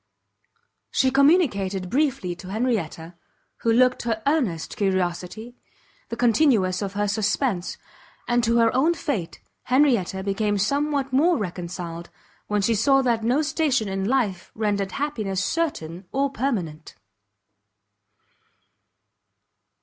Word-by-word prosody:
She 260 -1 +2
communicated 255 - +2
briefly 265 - 0
to 185 - -10
Henrietta, 195 -7 -2 0.4
who 230 - 0
looked 250 +2 +3
her 225 -2 -2
earnest 250 - 0
curiosity, 185 +3 -2 0.6
the 230 - -3
continuance 230 -7 +3
of 200 -1 -3
her 205 0 0
suspense; 205 -1 -1 0.5
and 240 0 +2
to 230 +1 +2
her 230 -1 +4
own 315 +7 +3
fate 240 - -4 0.2
Henrietta 245 -9 +2
became 205 +1 0
somewhat 280 +5 0
more 325 +5 +4
reconciled, 175 -3 -5 0.4
when 210 -1 0
she 230 - +2
saw 270 +5 +3
that 235 -3 +1
no 255 +7 +2
station 275 -6 0
in 195 0 -2
life 210 -7 0
rendered 205 -3 -1
happiness 215 -10 -2
certain 185 - -3
or 275 +1 0
permanent. 190 - -3
220 Hz, 115 wpm, -24 LUFS, 190-270 Hz, 0.6 s, her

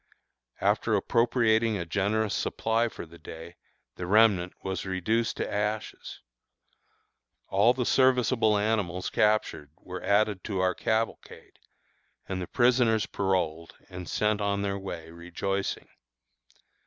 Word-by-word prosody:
After - - +2
appropriating 115 -2 +2
a 85 - -4
generous 105 +4 0
supply 115 +1 0
for - - -8
the 85 +1 -16
day, 80 +2 -10 0.4
the 90 - -5
remnant 100 -3 +4
was 95 0 -3
reduced 105 +5 -1
to - - -2
ashes. 105 +1 -3 1.3
All 105 +6 +4
the 125 -1 -1
serviceable 125 -5 +3
animals 100 -4 -1
captured 105 -9 +1
were 90 0 -8
added 100 -1 +1
to 100 -4 -2
our 90 0 +2
cavalcade, 110 +5 -3 0.7
and 95 -1 -3
the 90 - -5
prisoners 120 -4 +3
paroled 85 -4 -2
and 90 -1 -8
sent 105 0 0
on 100 0 0
their 100 0 -2
way 85 -4 -7
rejoicing. 90 +4 -3
100 Hz, 120 wpm, -28 LUFS, 90-110 Hz, 1.3 s, remnant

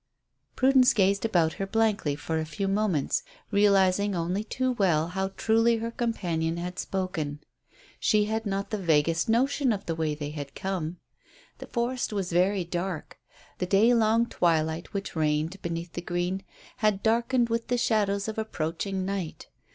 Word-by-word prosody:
Prudence 260 -1 +5
gazed 200 +1 +2
about 170 -7 +2
her 195 - -1
blankly 210 -9 +1
for 160 +2 -2
a 160 - -2
few 195 +5 -3
moments, 195 -7 +1 0.3
realizing 200 -1 +3
only 180 +4 -1
too 255 +4 -1
well 175 -8 +2
how 190 +1 -1
truly 225 +1 +3
her 230 +1 -3
companion 170 -9 -1
had 180 +1 -5
spoken. 170 -6 -3 0.6
She 210 -2 +3
had 220 +1 -2
not 195 0 -2
the 215 - -1
vaguest 165 +1 +2
notion 260 +3 +2
of 205 -3 -3
the 165 - -1
way 160 -2 -1
they 145 0 -5
had 145 -2 -7
come. 180 -3 -3 0.6
The - - -8
forest 240 +1 -1
was 195 -4 -2
very 185 +2 +2
dark. 175 -1 -4 0.4
The 180 - -1
day 210 +6 +5
long 230 0 +3
twilight 165 -4 0
which 200 -2 -4
reigned 155 +4 0
beneath 170 0 -4
the 175 - -4
green 175 +2 -2 0.4
had 210 -2 +1
darkened 235 +2 +2
with 230 0 -1
the 245 - +1
shadows 205 -4 +1
of 220 0 -3
approaching 190 -1 -3
night. 190 -4 -4
195 Hz, 160 wpm, -27 LUFS, 170-220 Hz, 0.6 s, Prudence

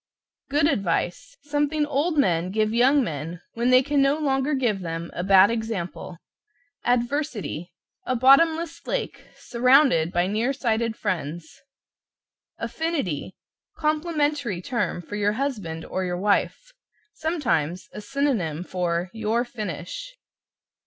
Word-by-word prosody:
=GOOD 290 +1 +2
ADVICE= 195 - -1
Something 295 +1 0
old 300 +3 0
men 180 - +2
give 215 +2 0
young 265 +4 +4
men 165 - -5
when 235 +2 0
they 255 +1 +6
can 285 +1 +1
no 275 +2 +3
longer 275 -1 0
give 240 -7 0
them 165 -1 -5
a 175 - -3
bad 195 +2 +6
example. 220 -6 -4 0.7
=ADVERSITY= 240 - -1 0.4
A 255 - +1
bottomless 320 +6 +4
lake, - - -3
surrounded 250 - +3
by 175 0 +1
near 220 +7 0
sighted 230 -3 0
friends. 170 -4 -4 1.0
=AFFINITY= 280 - -3 0.4
Complimentary 300 - 0
term 205 -4 -2
for 205 - -7
your 205 0 +1
husband 210 - -3
or 190 - -3
your 180 -1 -2
wife. 210 - 0 0.4
Sometimes 185 - -1
a 210 - -7
synonym 205 - -1
for 180 -1 -2
"Your 225 +2 0
finish." 230 - -6
230 Hz, 120 wpm, -24 LUFS, 180-285 Hz, 1.0 s, they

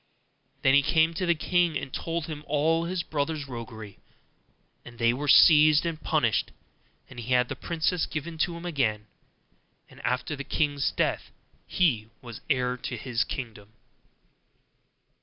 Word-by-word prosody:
Then 135 - +5
he 140 0 +5 0.2
went 160 +1 +3
to 185 -2 -1
the 170 - +3
king, 175 +1 +1
and 135 - -7
told 165 -1 -3
him 155 -2 -7
all 160 +3 +1
his 175 0 -2
brothers' 150 -1 -3
roguery; 115 -4 -9 0.8
and 120 -1 -13
they 115 0 +3
were 145 +4 -4
seized 155 +1 +7
and 165 -2 -3
punished, - - +1 0.6
and - - -11
he 120 +2 -2
had 125 0 +3
the - - -4
princess 170 +1 -1
given 160 +1 -6
to 170 +1 0
him 170 - -9
again; 115 -11 -1 0.9
and - - -14
after 125 +4 -1
the 140 - -6
king's 145 -1 0
death - - -1 0.4
he 120 -12 +1
was 120 -3 -10
heir 125 -2 +1
to 125 0 -5
his 120 +1 -1
kingdom. 110 -6 -7
145 Hz, 155 wpm, -27 LUFS, 125-165 Hz, 0.9 s, seized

